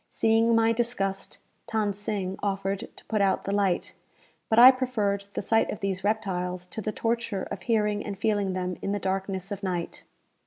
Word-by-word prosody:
Seeing 225 +1 +3
my 225 0 +4
disgust, 225 -5 -2 0.3
Than 215 -2 +1
Sing 200 -2 -3
offered 195 -1 -2
to - - -14
put 215 -2 0
out 195 -1 +2
the 195 - -3
light; 200 -3 0 0.6
but 220 - +2
I 250 +2 +11
preferred 215 -7 -1
the - - -2
sight 225 +3 +2
of - - -4
these 190 -2 -2
reptiles 185 -4 -1
to 220 - -3
the 215 - -2
torture 230 -3 -1
of 190 - -5
hearing 210 -3 +1
and 205 -2 -5
feeling 205 -2 0
them 180 -1 -3
in 200 - -2
the 205 - -1
darkness 190 0 -3
of 200 -1 -4
night. 180 -3 -3
200 Hz, 185 wpm, -27 LUFS, 190-220 Hz, 0.6 s, I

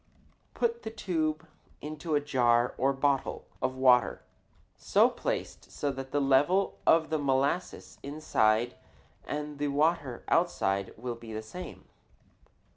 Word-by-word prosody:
Put 470 0 0
the - - -5
tube 160 -7 -2 0.3
into 155 +1 -3
a - - +4
jar 125 -4 +2
or 135 +2 +3
bottle 135 0 0 0.2
of 130 - -1
water 125 -2 +4 0.5
so - - +3
placed - - -5
that 135 -2 -2
the 145 - +1
level 145 +8 +2
of 160 -1 +4
the 155 - +1
molasses 140 +5 -1
inside 120 -5 +1 0.5
and 150 -1 -5
the 145 - 0
water 145 -3 0
outside 100 - +1
will 120 +2 -4
be 115 -1 -10
the 110 0 -4
same. 180 +12 -9
140 Hz, 125 wpm, -29 LUFS, 125-155 Hz, 0.5 s, a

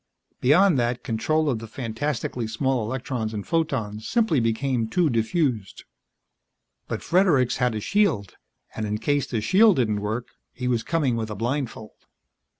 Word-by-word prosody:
Beyond 155 +3 +4
that, 120 +1 -1
control 135 +8 0
of 125 -6 0
the 115 - -8
fantastically 120 0 -3
small 125 +2 0
electrons 120 -1 -3
and 105 - -4
photons 115 -10 -1
simply 220 - +2
became 115 +1 0
too 160 +6 +1
diffused. 115 - -1 1.0
But - - -4
Fredericks 165 -9 +3
had 125 -3 +1
a - - -1
shield. 150 - +1 0.4
And 110 -1 -3
in 105 +1 -1
case 145 +5 0
the 115 -4 -2
shield 205 - +5
didn't 110 -6 +1
work, 110 +4 -3 0.2
he 125 - -4
was 120 -2 +1
coming 135 -2 0
with 110 -1 -3
a 105 - -5
blindfold. 120 0 -3
125 Hz, 150 wpm, -24 LUFS, 110-145 Hz, 1.0 s, shield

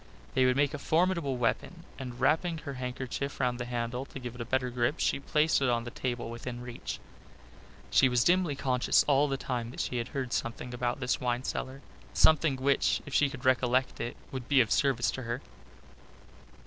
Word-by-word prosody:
They 130 - +4
would 125 0 +3
make 145 0 +2
a 145 - -4
formidable 165 -3 +1
weapon, 125 +8 -1 0.2
and 125 -2 -6
wrapping 160 +5 +2
her 145 -2 -6
handkerchief 130 +2 -4
round 125 -1 0
the 120 - -3
handle 120 +1 -3
to - - -10
give 125 -2 -6
it 125 - -8
a - - -3
better 125 +1 0
grip 120 +5 0
she - - +1
placed 150 +2 +2
it 135 - +2
on 120 -1 +1
the 120 - -7
table 120 -2 -3
within 120 +1 -6
reach. 120 -1 -6 0.9
She 135 - +5
was 125 -1 +3
dimly 175 -4 +3
conscious 130 -2 +2
all 145 0 +4
the 135 -1 -1
time 120 -3 -3
that 125 - -9
she 125 - -1
had 120 0 -2
heard 130 -3 -4
something 120 +1 -3
about 125 +2 -2
this 125 - 0
wine 125 0 0
cellar 130 +1 -4 0.3
something 155 -2 +5
which, 135 +1 +1
if 145 - -8
she 145 - +4
could 130 -2 -9
recollect 130 0 +2
it, 120 - -4
would 130 -2 -5
be 140 -2 +4
of 115 -4 +3
service 135 -4 +2
to 130 - -5
her. 120 0 -3
130 Hz, 200 wpm, -30 LUFS, 120-140 Hz, 0.9 s, She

